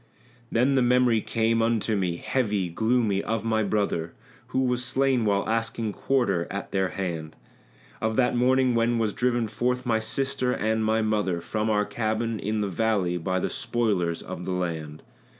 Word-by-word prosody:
Then 125 +4 +3
the 135 - +3
memory 125 -2 +3
came 115 +1 +1
unto 115 -1 +1
me, 90 -4 0
heavy, 105 -8 -1
gloomy, 110 +1 +1
of 115 +1 -2
my 110 -1 +1
brother 100 -5 -1 0.3
Who 130 - 0
was 125 -1 0
slain 130 -2 +1
while 100 -1 +1
asking 115 -1 -1
quarter 100 -12 0
at 100 0 -5
their 95 -1 +1
hand; 80 -3 -4 0.7
Of 110 0 0
that 125 0 +2
morning 130 +1 +3
when 115 0 +2
was 110 -3 0
driven 120 -2 +1
forth 125 +4 -1
my 115 -2 +2
sister 130 +2 -1
and 110 +1 0
my 110 +1 +2
mother 105 -5 0
From 105 +6 -2
our 105 -1 +2
cabin 110 0 -2
in 105 +1 -1
the 100 - 0
valley 95 -2 0
by 95 +3 -1
the - - -2
spoilers 110 -10 -1
of 90 - -7
the 95 - -3
land. 80 -4 -4
110 Hz, 170 wpm, -26 LUFS, 100-120 Hz, 0.7 s, Then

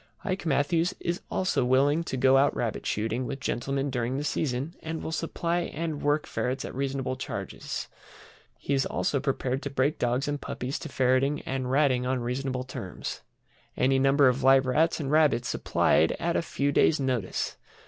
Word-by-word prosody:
IKE 185 -3 -2
MATTHEWS 165 +4 +1
is 170 +1 -2
also 185 -8 +1
willing 140 +6 +3
to 135 - -3
go 130 +1 +5
out 140 +1 +4
rabbit 115 -3 -2
shooting 115 +4 -1
with 135 - -4
gentlemen 135 +2 -2
during 125 +1 -1
the 145 - -2
season, 140 +1 -2
and 160 0 -5
will - - -4
supply 170 +1 -1
and 160 -2 -3
work 145 +1 +1
ferrets 130 +1 -2
at - - -7
reasonable 135 -1 -2
charges. 130 - -5 0.7
He 140 - -2
is 135 -1 +2
also 140 - 0
prepared 130 0 -1
to 140 - -4
break 140 +2 0
dogs 125 +3 0
and 145 -1 -2
puppies 130 +3 -4
to - - -7
ferreting 130 +3 +2
and 130 -1 -3
Ratting 130 -2 +2
on 130 0 0
reasonable 130 +1 -2
terms. 100 -8 -6 0.6
Any 135 +1 +3
number 135 +1 +5
of 130 +2 +2
live 135 0 +5
Rats 155 +7 +2
and 140 -2 -2
rabbits 150 -6 +3
supplied 80 - +2
at 170 0 -2
a - - +2
few 145 -3 -1
days' 155 +2 +3
notice. 125 -8 -1
135 Hz, 180 wpm, -27 LUFS, 130-150 Hz, 0.7 s, go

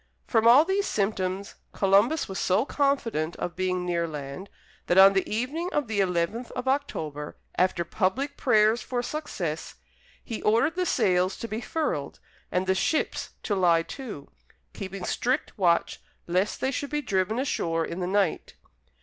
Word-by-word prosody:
From 225 -1 +3
all 265 +7 +8
these 390 +2 0
symptoms, 195 -1 -1 0.2
Columbus 205 +10 +3
was 190 - -5
so 185 +7 +2
confident 235 - 0
of 175 - -4
being 185 -1 -1
near 170 -1 0
land, 150 +4 -7 0.4
that 175 - +2
on 195 +1 +9
the 195 - 0
evening 275 +11 -2
of 295 -4 0
the 215 -2 -1
eleventh 190 +6 0
of 250 0 -5
October, 155 - -2 0.2
after 180 -2 +1
public 240 - -1
prayers 220 -3 +3
for 245 -1 -3
success, 180 - -4 0.5
he 230 - -5
ordered 230 +9 +3
the 365 0 -1
sails 185 -5 +2
to 230 - -5
be 220 +1 -4
furled, 265 - -2 0.3
and 180 +1 0
the 190 - +2
ships 305 +11 -1
to 210 - -1
lie 175 -4 +3
to, 215 - -8 0.5
keeping 195 -2 -6
strict 255 - -1
watch 175 -4 +1 0.2
lest 185 +4 0
they 265 - +1
should 285 +1 -3
be 295 0 -2
driven 195 +1 0
ashore 165 - 0
in 170 - -6
the 180 - -2
night. 195 -3 0
200 Hz, 160 wpm, -26 LUFS, 180-255 Hz, 0.5 s, on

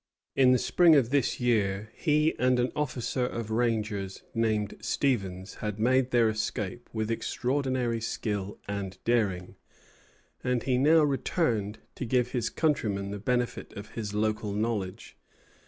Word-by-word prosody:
In 130 -2 +6
the 130 - +5
spring 155 +7 +5
of 130 -4 +3
this 135 -4 +1
year 110 -4 +1
he 150 0 +2
and 125 0 +3
an 125 +1 +1
officer 130 -3 -1
of 115 -3 -3
rangers 110 -4 -1
named 110 -3 0
Stevens 100 -6 -1
had 105 -1 -3
made 130 +3 +3
their 120 -2 +4
escape 110 +1 -3
with 110 0 -2
extraordinary 125 -1 -1
skill 105 -3 -3
and 100 -2 -4
daring; 100 -7 0 0.9
and 125 -2 0
he 125 -2 +1
now 155 +3 +5
returned 120 - 0
to 130 - -5
give 125 +1 +1
his 120 -4 -1
countrymen 105 -11 0
the 100 - -5
benefit 125 +3 -1
of 100 +1 -8
his 110 -3 -5
local 105 0 -1
knowledge. 105 -3 -3
115 Hz, 140 wpm, -28 LUFS, 105-125 Hz, 0.9 s, In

